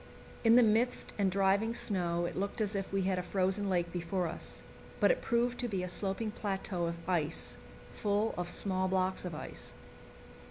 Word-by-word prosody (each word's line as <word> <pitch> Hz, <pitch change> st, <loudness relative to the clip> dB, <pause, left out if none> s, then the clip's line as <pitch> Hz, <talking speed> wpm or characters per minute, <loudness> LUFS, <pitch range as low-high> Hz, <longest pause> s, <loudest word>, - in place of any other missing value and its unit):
In 225 Hz, 0 st, +7 dB
the 245 Hz, -, +8 dB
mist 225 Hz, +3 st, +2 dB
and 195 Hz, -1 st, +3 dB
driving 200 Hz, +4 st, +2 dB
snow 175 Hz, -6 st, 0 dB
it -, -, -4 dB
looked 200 Hz, +4 st, -2 dB
as 210 Hz, -1 st, +1 dB
if 195 Hz, -1 st, -2 dB
we 195 Hz, -1 st, +1 dB
had 185 Hz, -1 st, +1 dB
a -, -, 0 dB
frozen 190 Hz, +2 st, 0 dB
lake 175 Hz, -2 st, +1 dB
before 175 Hz, +1 st, -1 dB
us; 165 Hz, -, -5 dB, 0.4 s
but -, -, +6 dB
it -, -, 0 dB
proved 240 Hz, +1 st, +1 dB
to 245 Hz, -, -1 dB
be 195 Hz, -5 st, -2 dB
a -, -, -2 dB
sloping 195 Hz, +4 st, 0 dB
plateau 190 Hz, -4 st, -2 dB
of 170 Hz, 0 st, -6 dB
ice, 160 Hz, -, -1 dB, 0.3 s
full 210 Hz, +2 st, 0 dB
of 175 Hz, -1 st, -3 dB
small 185 Hz, 0 st, 0 dB
blocks 185 Hz, 0 st, 0 dB
of 175 Hz, -3 st, -4 dB
ice. -, -, -7 dB
190 Hz, 190 wpm, -33 LUFS, 180-210 Hz, 0.4 s, the